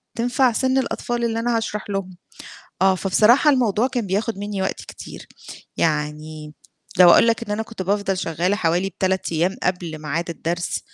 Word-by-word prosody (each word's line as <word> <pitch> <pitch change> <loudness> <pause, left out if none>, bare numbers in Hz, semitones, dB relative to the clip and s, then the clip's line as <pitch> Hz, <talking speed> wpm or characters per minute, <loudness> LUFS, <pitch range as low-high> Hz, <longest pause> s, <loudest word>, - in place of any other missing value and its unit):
تنفع 245 +2 +2
سن 260 +3 +1
الأطفال 240 -2 -2
اللي 230 -1 0
أنا 235 0 0
هاشرح 210 -2 -4
لهم، 190 -2 -4 0.7
آه، 190 0 +5
فبصراحة 215 - +4
الموضوع 240 -4 +2
كان 240 -5 -3
بياخد 205 +3 -2
مني 205 -1 -3
وقت 190 - -2
كتير، - - -11 0.5
يعني 150 0 -2 0.4
لو 180 -1 +9
أقول 230 - +6
لك 230 - +1
إن 205 - -10
أنا 220 +1 -1
كنت 225 -3 -7
بافضل 195 0 -1
شغالة 175 +5 -1
حوالي 180 +1 0
3 190 -2 0
أيام 175 +4 0
قبل 175 -3 -2
ميعاد 165 +3 -3
الدرس، 170 +1 -3
195 Hz, 165 wpm, -21 LUFS, 175-230 Hz, 0.7 s, لو